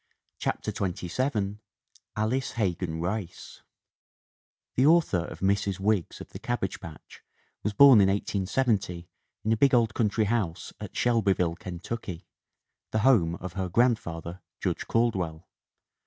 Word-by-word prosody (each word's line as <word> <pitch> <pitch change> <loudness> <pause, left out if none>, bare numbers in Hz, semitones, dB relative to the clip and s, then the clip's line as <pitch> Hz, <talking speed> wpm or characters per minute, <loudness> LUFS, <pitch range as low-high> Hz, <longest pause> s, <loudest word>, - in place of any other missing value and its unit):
CHAPTER - - -2
XXVII 100 +3 -2 0.6
ALICE 115 +5 0
HEGAN 90 -6 -1
RICE 95 +1 -5 1.1
THE 130 - +2
author 155 - +4
of - - -9
Mrs. 100 0 +1
Wiggs 100 -2 0
of - - -10
the - - -9
Cabbage 120 -6 -2
Patch 85 -6 -12 0.4
was 105 - -2
born 130 -1 +8
in 95 - +5
1870 100 -2 0 0.4
in 110 - 0
a - - +4
big 135 +2 +4
old 115 -2 +3
country 110 -1 +1
house 100 -7 -2
at - - -8
Shelby 115 -5 +3
ville, 85 -3 -1
Kentucky, 90 +1 -6 0.6
the 110 - 0
home 90 -11 +4
of 90 0 -7
her 95 -2 -3
grandfather, 90 -6 0 0.2
Judge - - -2
Caldwell. 95 -9 0
100 Hz, 130 wpm, -27 LUFS, 90-115 Hz, 1.1 s, born